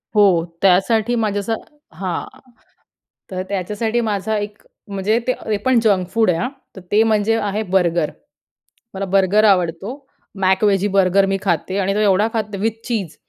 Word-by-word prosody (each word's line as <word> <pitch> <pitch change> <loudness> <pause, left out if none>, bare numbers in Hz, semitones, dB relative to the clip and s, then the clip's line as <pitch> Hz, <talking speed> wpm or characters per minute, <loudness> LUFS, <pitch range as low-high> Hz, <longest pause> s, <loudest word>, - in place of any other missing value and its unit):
हो, 190 -5 +4 0.2
त्यासाठी 215 +5 +3
माझ्या 215 -3 0
असं 225 +3 -2 0.4
हां, 180 0 -3 1.1
तर 185 -1 -3
त्याच्यासाठी 210 +4 -1
माझा 215 -1 -1
एक 205 +1 -6 0.3
म्हणजे 200 +3 0
ते 255 - +2 0.2
ते 215 - +1
पण 255 -2 +4
जंक 195 -5 +1
फूड 225 -4 +2
आहे 165 - 0
हां. 250 - -1 0.3
तर - - -8
ते 210 +1 +5
म्हणजे 220 0 +2
आहे 205 +1 -2
बर्गर. 175 -5 +1 0.8
मला 195 0 -3
बर्गर 195 +2 +3
आवडतो 180 0 +1 0.5
मॅकवेजी 195 +1 +2
बर्गर 195 0 +3
मी 195 0 0
खाते 185 0 -1
आणि 195 0 0
तो - - 0
एवढा 205 0 +3
खाते 215 -3 -3
विथ 225 +2 -2
चीज 200 -10 -3
200 Hz, 160 wpm, -19 LUFS, 190-215 Hz, 1.1 s, ते